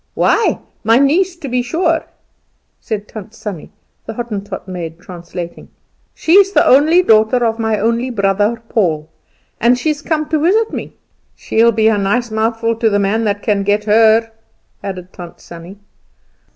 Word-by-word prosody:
"Why, 455 - +2 0.3
my 225 +1 +4
niece, 340 +7 +2
to 330 -5 -8
be 250 -1 0
sure," 325 +6 0 0.8
said 210 -2 -5
Tant 215 +1 -10
Sannie, 200 -9 -7 0.4
the 225 - -5
Hottentot 210 -5 -6
maid 170 -3 -6
translating. 175 -1 -9 0.5
"She's 390 +4 +4
the - - +4
only 315 +7 +5
daughter 220 0 +3
of 225 0 -1
my 220 -1 0
only 235 +4 0
brother 205 +1 0
Paul, 160 -9 -1 0.5
and 240 +2 +3
she's 300 +3 -2
come 310 -1 -2
to 315 - +1
visit 420 +8 +1
me. - - -6 0.4
She'll 230 +1 +2
be 220 0 +2
a 215 -2 +2
nice 220 +4 -1
mouthful 225 +1 -1
to 230 -1 +2
the 205 - +1
man 205 +3 0
that 205 -1 -2
can 205 -2 +1
get 205 +1 0
her," 225 +1 +3 0.5
added 185 -2 -7
Tant 175 -2 -11
Sannie. 170 +3 -12
225 Hz, 155 wpm, -16 LUFS, 200-250 Hz, 0.8 s, only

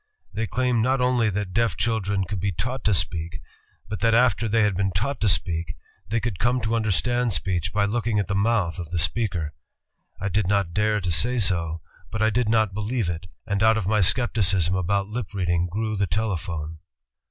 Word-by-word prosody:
They 110 +1 -2
claimed 125 -1 +1
not 130 +4 +2
only 125 -3 +2
that 100 -2 -3
deaf 115 -6 +1
children 100 -4 0
could 95 +2 -4
be 100 +2 0
taught 125 +9 -3
to 105 - +4
speak... 85 -1 -1 0.5
but 105 -2 -4
that 115 +3 +3
after 115 -2 +3
they 110 +1 +3
had 105 -2 +1
been 95 +1 +1
taught 115 +10 -2
to 110 - +3
speak, 85 -4 0 0.3
they 115 +2 +1
could 115 -6 -3
come 125 +1 +2
to 110 - -2
imder 110 -2 +1
stand 120 +7 +1
speech 90 -1 -1
by 105 -1 +1
looking 110 +1 0
at 100 -3 0
the 100 - -2
mouth 100 -4 +1
of 85 -3 -6
the 90 - -2
speaker... 85 -3 -1 0.7
I 100 - -2
did 100 -1 0
not 100 -4 +1
dare 105 +1 +1
to 90 -1 -1
say 120 +9 +2
no, 85 -2 -3 0.3
but 110 - -4
I 110 - +3
did 115 0 +1
not 110 -3 +2
believe 105 -1 -1
it, 85 +2 -7 0.2
and 100 -3 -1
out 110 0 +5
of 105 - -2
my 105 +1 +2
skepticism 95 -4 +2
about 95 +2 0
lip 105 -2 -5
reading 85 -2 +1
grew 110 +4 -2
the 100 -1 0
tele 105 +3 0
phone." 80 -2 -6
100 Hz, 210 wpm, -24 LUFS, 90-115 Hz, 0.7 s, out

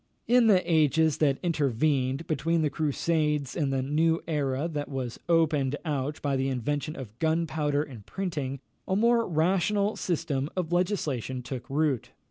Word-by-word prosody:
In 245 -1 +5
the 190 -4 +5
ages 160 -1 +3
that 140 -3 +3
intervened 140 -2 +1
between 165 +1 0
the 150 - +1
Crusades 150 -2 0
and 145 -5 0
the 135 -1 0
new 160 +4 +1
era 145 -1 0
that 150 -3 -4
was 130 -4 -4
opened 150 -5 +2
out 145 -1 -2
by 140 -2 +1
the 135 0 0
invention 145 +4 -2
of 115 -4 -9
gunpowder 155 -2 +1
and 125 -9 -11
printing, 145 - -4 0.3
a 190 - +1
more 230 +2 +3
rational 190 +5 +1
system 150 -5 -1
of 175 -2 -1
legislation 145 - -1
took 130 +1 -6
root. 145 -3 0
150 Hz, 150 wpm, -28 LUFS, 135-165 Hz, 0.3 s, In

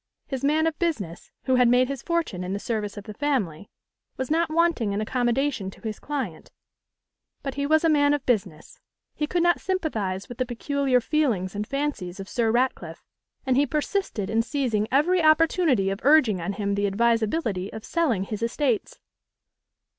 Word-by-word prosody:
His 265 -2 -5
man 305 +3 +3
of 325 -1 -1
business, 215 - -3
who 260 -1 +2
had 250 -1 +5
made 250 +1 +4
his 275 -2 -5
fortune 330 - -2
in 180 +1 -3
the 200 - -2
service 210 -2 -3
of 205 - -6
the 215 - -8
family, 210 - -2 0.5
was 260 +2 -3
not 330 +1 +2
wanting 315 -10 +1
in 200 - -1
accommodation 245 -1 0
to - - -15
his 220 -2 -5
client; 260 - -5 0.9
but 275 -1 -3
he 280 +1 -2
was 315 +2 +3
a - - +4
man 290 -2 +4
of 285 - -6
business; 190 -10 -2 0.3
he 300 - -2
could 345 +2 0
not 345 -1 +3
sympathise 215 - -2
with 245 - -10
the 255 - +1
peculiar 260 +1 0
feelings 235 - 0
and 210 +1 -4
fancies 275 -11 -3
of 195 - -6
Sir 230 +1 0
Ratcliffe, 250 +3 -1 0.4
and 260 -1 +2
he 285 +2 +3
persisted 300 - -2
in 225 - +3
seizing 230 -5 -1
every 340 +7 +3
opportunity 310 - +3
of 195 - -4
urging 255 - +4
on 175 +4 -2
him 200 0 -2
the 200 0 +1
advisability 220 - 0
of 220 - -8
selling 280 - +1
his 210 +2 -5
estates. 235 0 -1
250 Hz, 180 wpm, -25 LUFS, 205-295 Hz, 0.9 s, had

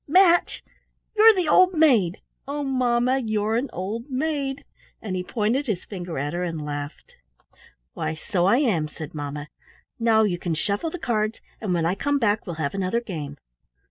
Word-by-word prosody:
Match! 350 +2 +4 0.5
You're 440 +1 +8
the 365 -4 0
old 370 +4 +5
maid. 240 - +3 0.3
Oh, 290 +1 -3
Mamma! 255 -1 +2
You're 220 -2 0
an 250 +3 -1
old 220 - -5
maid!" 275 0 -2 0.3
And 195 -4 -4
he 180 - -1
pointed 235 +7 0
his 205 -6 -2
finger 175 -5 -6
at 145 +3 -2
her 175 +1 -2
and 165 -3 -3
laughed. 145 0 -6 0.8
"Why, - - -3
so 175 +3 0
I 210 - +5
am," 205 - +1
said 150 0 -9
mamma. 145 0 -5 0.5
"Now 225 -1 +4
you 180 -5 0
can 170 -2 -2
shuffle 200 - -1
the 360 - -6
cards, 220 -6 -1 0.2
and 195 -5 0
when 165 -1 0
I 170 - +2
come 285 +8 0
back 220 -4 +1
we'll 175 - -4
have 155 -3 -2
another 195 +4 0
game." 155 -11 -6
215 Hz, 175 wpm, -24 LUFS, 175-270 Hz, 0.8 s, You're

